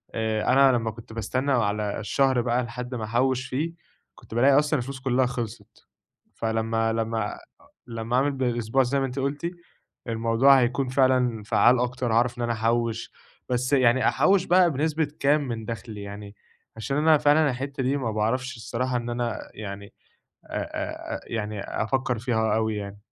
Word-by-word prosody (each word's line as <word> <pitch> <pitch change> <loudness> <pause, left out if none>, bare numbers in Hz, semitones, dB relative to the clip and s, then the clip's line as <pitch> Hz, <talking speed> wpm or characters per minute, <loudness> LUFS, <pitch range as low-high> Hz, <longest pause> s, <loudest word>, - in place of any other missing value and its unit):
آآ 110 -1 -1
أنا 135 0 +6
لما 115 -3 0
كنت 110 0 -12
باستنى 130 +5 -1
على 105 -4 0
الشهر 130 +4 +2
بقى 120 +1 0
لحد 125 +2 -6
ما 115 - -4
أحوّش 125 +4 0
فيه، 155 +6 -2 0.4
كنت - - -14
بالاقي 135 +4 +5
أصلًا 150 0 +1
الفلوس 135 +2 -6
كلها 130 -1 +1
خلصِت، 115 -3 -6 0.5
فلما 115 0 0
لما 115 -2 -2 0.5
لما 115 +1 -3
أعمل 140 +3 +3
بالأسبوع 125 -1 0
زي 135 +3 0
ما 135 - 0
أنتِ 130 +1 -4
قُلتِ، 145 +5 -2 0.6
الموضوع 115 +4 +4
هيكون 125 +2 0
فعلًا 130 -4 +2
فعَّال 115 +3 +4
أكتر، 125 -1 -1
هاعرف 120 +1 +2
إن 120 - -1
أنا 120 - 0
أحوِّش. 115 0 -1 0.4
بس 125 +2 0
يعني 130 -2 +4
أحوِّش 190 -1 +3
بقى 180 -1 +4
بنسبة 155 +2 0
كام 145 +1 +2
من 115 -1 -4
دخلي؟ 110 -2 -6
يعني 100 0 -9 0.4
عشان 135 +5 -2
أنا 155 0 +5
فعلًا 150 +1 +4
الحتة 135 +2 -3
دي 135 +3 +1
ما 120 -5 -2
باعرفش 125 +5 -1
الصراحة 125 +2 -2
إن 120 0 -4
أنا 120 -1 -2
يعني 100 -1 -7 0.6
أ - - -6 0.6
أ - - -9
يعني 105 -3 -4
أفكّر 125 +4 -1
فيها 110 -2 0
أوي 110 -1 0
يعني. 100 0 -6
120 Hz, 165 wpm, -25 LUFS, 110-135 Hz, 0.6 s, أنا